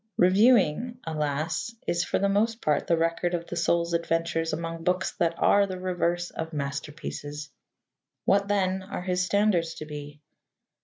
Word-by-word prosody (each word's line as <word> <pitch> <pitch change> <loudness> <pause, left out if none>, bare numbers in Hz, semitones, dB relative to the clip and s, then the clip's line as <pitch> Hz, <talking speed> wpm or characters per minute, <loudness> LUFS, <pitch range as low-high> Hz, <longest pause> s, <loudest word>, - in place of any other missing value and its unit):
Reviewing, 215 +3 +4
alas! 155 +6 -2
is 170 0 +1
for - - 0
the 200 - +2
most 220 +3 +1
part 150 -8 0
the 170 - +3
record 165 +2 0
of 170 -1 -4
the 175 - -6
soul's 170 0 +1
adventures 165 -1 0
among 165 0 -4
books 180 +1 +1
that 170 0 +2
are 200 0 +4
the 185 -1 -5
reverse 175 -1 -1
of 160 0 -5
masterpieces. 145 +1 -5 0.7
What, 200 0 +3
then, 190 -2 +1
are 190 -1 -6
his 180 -1 0
standards 180 -4 +1
to 155 - -7
be? 150 -1 -8
170 Hz, 155 wpm, -27 LUFS, 160-190 Hz, 0.7 s, Reviewing